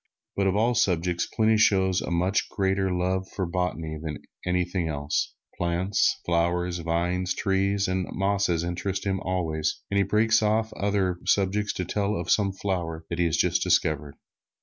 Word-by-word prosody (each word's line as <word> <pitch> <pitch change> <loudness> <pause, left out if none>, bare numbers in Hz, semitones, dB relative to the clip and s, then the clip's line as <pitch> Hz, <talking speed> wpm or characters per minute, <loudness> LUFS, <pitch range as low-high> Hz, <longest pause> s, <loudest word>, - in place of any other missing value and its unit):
But 100 -1 +1
of 95 - +1
all 115 +4 +3
subjects, 90 -6 +1
Pliny 110 0 +2
shows 95 -3 +3
a - - -4
much 90 +3 +1
greater 95 -1 0
love 95 +1 -1
for 95 - -1
botany 85 -3 -2
than 80 -2 -4
for 90 - -10
anything 90 -1 0
else. 70 -1 -2 0.2
Plants, 90 +3 +1
flowers, 85 +1 0
vines, 90 +2 -1
trees 100 0 +1
and 95 -1 -1
mosses 95 -3 +1
interest 90 +3 -3
him 95 -1 0
always, 80 -5 -2
and 100 - +2
he - - +4
breaks 110 +3 +3
off 110 +1 +1
other 95 -3 0
subjects 100 +2 +2
to 90 - -3
tell 100 +3 -1
of 85 -1 -2
some 100 -2 +3
flower 85 -4 -3
that 85 - -3
he 85 - +3
has 80 - +1
just - - +2
discovered. 75 -2 +1
95 Hz, 170 wpm, -26 LUFS, 85-100 Hz, 0.2 s, he